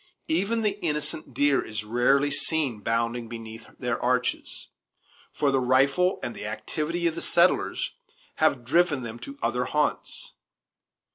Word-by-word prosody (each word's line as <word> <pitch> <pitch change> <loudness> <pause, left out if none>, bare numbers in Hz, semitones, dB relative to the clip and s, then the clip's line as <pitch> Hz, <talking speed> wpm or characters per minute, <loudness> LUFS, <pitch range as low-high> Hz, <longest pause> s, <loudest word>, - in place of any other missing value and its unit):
Even 230 -7 +1
the 205 -1 0
innocent 150 -2 -1
deer 145 +1 +3
is 110 -1 -5
rarely 125 +6 +2
seen 145 -4 +2
bounding 115 +2 -1
beneath 115 -1 -8
their 125 -2 -2
arches; 125 0 -1 0.7
for 145 -2 +1
the 135 - +2
rifle 135 +8 +3
and 120 - -3
the 105 - -6
activity 155 +10 -3
of 165 - +2
the 170 - -5
settlers 185 - +2 0.5
have 140 -6 +2
driven 150 -1 +2
them 115 0 -7
to 140 +4 -9
other 120 +2 0
haunts. 150 +2 -2
135 Hz, 140 wpm, -26 LUFS, 120-155 Hz, 0.7 s, deer